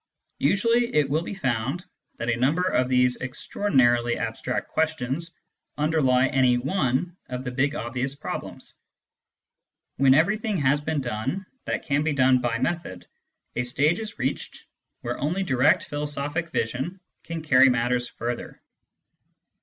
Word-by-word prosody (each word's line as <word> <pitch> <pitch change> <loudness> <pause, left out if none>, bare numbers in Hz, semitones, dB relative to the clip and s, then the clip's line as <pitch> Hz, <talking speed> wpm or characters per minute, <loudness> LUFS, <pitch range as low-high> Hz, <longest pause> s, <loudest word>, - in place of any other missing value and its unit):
Usually 230 - +2
it 150 -2 +4
will 155 +2 +2
be 185 - -6
found 135 +3 -2 0.3
that 115 - -4
a - - +1
number 140 +9 +1
of 130 -9 +1
these 125 -1 +3
extra 130 +8 -6
ordinarily 120 -8 +3
abstract 115 +2 -3
questions 160 +1 -1 0.4
underlie 145 -4 +3
any 130 -2 +3
one 140 +3 0
of 125 0 -4
the 125 - -4
big 140 +3 0
obvious 130 +2 -3
problems. - - -6 1.2
When 135 0 +5
everything 205 +6 +2
has 145 -1 +2
been 155 -1 -1
done 130 - -3 0.2
that - - -2
can 145 0 +1
be 155 0 0
done 130 -2 +4
by 120 -2 0
method, 130 - -3 0.5
a - - +1
stage 140 +7 +1
is 220 -1 -6
reached 130 +2 -3 0.4
where - - -4
only 170 +7 0
direct 130 -4 +3
philosophic 145 +3 -3
vision 130 +10 -2 0.2
can 165 -1 -5
carry 135 -3 +6
matters 125 0 +1
further. 120 +1 -5
135 Hz, 140 wpm, -25 LUFS, 125-160 Hz, 1.2 s, carry